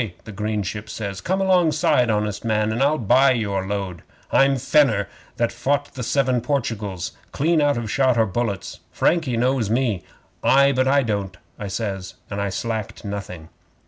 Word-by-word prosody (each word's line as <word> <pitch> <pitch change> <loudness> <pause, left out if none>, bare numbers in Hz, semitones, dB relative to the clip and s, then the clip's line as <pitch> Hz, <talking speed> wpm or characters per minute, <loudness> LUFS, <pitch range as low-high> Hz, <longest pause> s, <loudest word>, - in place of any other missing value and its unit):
the 110 - -9
green 105 0 -2
ship 105 +5 -5
says. 100 -3 -5
"Come 190 +2 0
alongside, 165 -8 +3
honest 105 -1 -1
man, 110 -1 +1
and 115 +4 -2
I'll 145 +3 +3
buy 130 +4 +4
your 100 -5 -2
load. 95 -4 -3 0.3
I'm 135 0 +4
Fenner 120 -7 +3 0.3
that 120 -1 +1
fought 140 +4 -1
the 130 - -6
seven 130 0 +1
Portugals 110 - -2 0.2
clean 160 +2 +2
out 145 -3 +2
of 115 -3 -3
shot 130 -3 +2
or 110 - +4
bullets. 100 -1 -3
Frankie 155 -9 +1
knows 125 -2 +1
me." 115 -5 +1 0.4
'"Ay, 140 +1 +5
but 130 0 +1
I 140 +1 +4
don't," 100 -5 -3 0.2
I 105 - -4
says, 95 -2 -4 0.2
and 100 0 -2
I 100 - -1
slacked 110 +1 -4
nothing. 95 -5 -6
115 Hz, 170 wpm, -22 LUFS, 100-135 Hz, 0.4 s, Ay